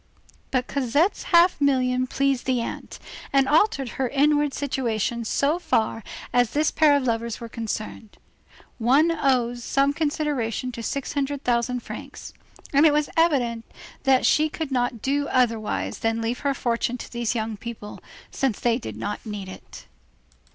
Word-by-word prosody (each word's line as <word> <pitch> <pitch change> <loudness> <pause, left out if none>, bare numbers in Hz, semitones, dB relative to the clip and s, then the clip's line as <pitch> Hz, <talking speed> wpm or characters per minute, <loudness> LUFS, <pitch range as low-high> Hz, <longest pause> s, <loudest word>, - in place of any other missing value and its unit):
But 255 -1 0
Cosette's 285 - 0
half 345 -2 +5
million 255 -2 +2
pleased 275 -1 0
the 255 -2 +2
aunt, 230 - -6 0.3
and 275 -1 +3
altered 295 - +2
her 255 - +1
inward 290 +1 +2
situation 235 -5 -2
so 280 +8 +1
far 225 -8 0 0.3
as 245 -2 +3
this 300 +1 +2
pair 300 -2 +4
of 280 - -2
lovers 230 -2 -2
were 235 - -7
concerned. 220 -1 -6 0.6
One 275 +8 +4
owes 250 -6 +1
some 275 +3 +2
consideration 290 -6 -1
to 235 - -7
six 275 +4 -3
hundred 285 0 -2
thousand 245 0 0
francs, - - -9 0.4
and 285 +3 +6
it 300 - +4
was 300 0 0
evident 255 -9 +2 0.4
that 265 -1 +3
she 310 +1 +3
could 310 -2 -5
not 245 -3 -1
do 285 +1 0
otherwise 230 -4 0
than 225 0 0
leave 230 +2 -2
her 280 -1 0
fortune 240 0 -1
to - - -9
these 235 -1 -2
young 220 -1 -2
people, 215 -1 -8 0.3
since 265 -6 -1
they 235 0 +1
did - - -7
not 205 0 -4
need 210 -3 -6
it. 185 - -11
255 Hz, 160 wpm, -24 LUFS, 230-285 Hz, 0.6 s, and